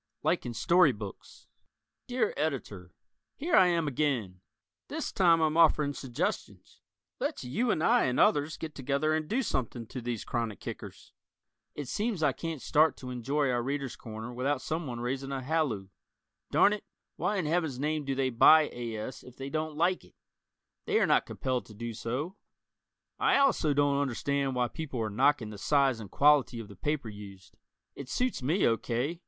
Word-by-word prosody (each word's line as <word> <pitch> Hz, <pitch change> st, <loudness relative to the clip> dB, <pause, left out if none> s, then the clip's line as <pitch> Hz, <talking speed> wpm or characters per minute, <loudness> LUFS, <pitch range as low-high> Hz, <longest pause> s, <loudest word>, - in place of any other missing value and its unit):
"Like -, -, +1 dB
in 120 Hz, -, -5 dB
Story 155 Hz, +6 st, +5 dB
Books" 105 Hz, -2 st, -10 dB, 0.6 s
Dear 245 Hz, -3 st, 0 dB
Editor: 120 Hz, -, -4 dB, 0.4 s
Here 330 Hz, +5 st, 0 dB
I 185 Hz, -, +7 dB
am 170 Hz, -3 st, +1 dB
again! 125 Hz, -10 st, -1 dB, 0.5 s
This -, -, -4 dB
time 170 Hz, -3 st, +4 dB
I'm 155 Hz, -1 st, +2 dB
offering 155 Hz, -3 st, +4 dB
suggestions. 130 Hz, -4 st, -4 dB, 0.4 s
Let's -, -, -2 dB
you 150 Hz, -, -1 dB
and 160 Hz, -7 st, +1 dB
I 235 Hz, +5 st, +4 dB
and 125 Hz, -, 0 dB
others 150 Hz, +1 st, +3 dB
get 155 Hz, -2 st, -6 dB
together 140 Hz, +3 st, 0 dB
and 155 Hz, -1 st, -1 dB
do 260 Hz, +5 st, +1 dB
something 120 Hz, -, -2 dB
to 125 Hz, +3 st, -7 dB
these 120 Hz, -2 st, -4 dB
chronic 115 Hz, -4 st, -3 dB
kickers. -, -, -9 dB, 0.6 s
It 145 Hz, -3 st, -5 dB
seems 205 Hz, -, -1 dB
I 145 Hz, -, +4 dB
can't 160 Hz, -1 st, -5 dB
start 155 Hz, +2 st, +3 dB
to 125 Hz, -1 st, -7 dB
enjoy 135 Hz, +3 st, 0 dB
our 120 Hz, -1 st, 0 dB
"Readers' 135 Hz, 0 st, -3 dB
Corner" 110 Hz, +1 st, -8 dB
without 130 Hz, +3 st, 0 dB
someone 145 Hz, -6 st, -4 dB
raising 135 Hz, +3 st, -3 dB
a 135 Hz, -1 st, -3 dB
halloo. 130 Hz, -10 st, -1 dB, 0.6 s
Darn 205 Hz, -, +5 dB
it! 210 Hz, -, -5 dB, 0.3 s
Why 210 Hz, -, -1 dB
in 180 Hz, -, -1 dB
heaven's 160 Hz, -4 st, 0 dB
name 150 Hz, +1 st, -1 dB
do 135 Hz, -1 st, -2 dB
they 130 Hz, -1 st, 0 dB
buy 155 Hz, +6 st, +6 dB
A. 120 Hz, -2 st, -5 dB
S. 110 Hz, +5 st, -6 dB
if 125 Hz, -, -14 dB
they 135 Hz, +1 st, -6 dB
don't 155 Hz, -1 st, -3 dB
like 180 Hz, +3 st, +1 dB
it? -, -, -21 dB, 0.7 s
They -, -, +3 dB
are -, -, +4 dB
not -, -, +3 dB
compelled 125 Hz, -5 st, -2 dB
to 110 Hz, -, -13 dB
do 115 Hz, +2 st, -5 dB
so. 140 Hz, -, -4 dB, 0.8 s
I -, -, +4 dB
also 275 Hz, -, +3 dB
don't 145 Hz, 0 st, +2 dB
understand 140 Hz, 0 st, -1 dB
why 125 Hz, -1 st, +1 dB
people 135 Hz, -2 st, -6 dB
are 110 Hz, -1 st, -2 dB
knocking 110 Hz, 0 st, +2 dB
the 105 Hz, -, -9 dB
size 135 Hz, -2 st, +2 dB
and 105 Hz, -3 st, -8 dB
quality 140 Hz, -3 st, +4 dB
of 110 Hz, -2 st, -8 dB
the 100 Hz, -, -11 dB
paper 145 Hz, +5 st, -2 dB
used. 100 Hz, -2 st, -11 dB, 0.4 s
It 135 Hz, -2 st, -8 dB
suits 250 Hz, -, -1 dB
me 160 Hz, +10 st, +2 dB
O. 115 Hz, -, +3 dB
K. 130 Hz, +10 st, -2 dB
140 Hz, 180 wpm, -30 LUFS, 120-155 Hz, 0.8 s, I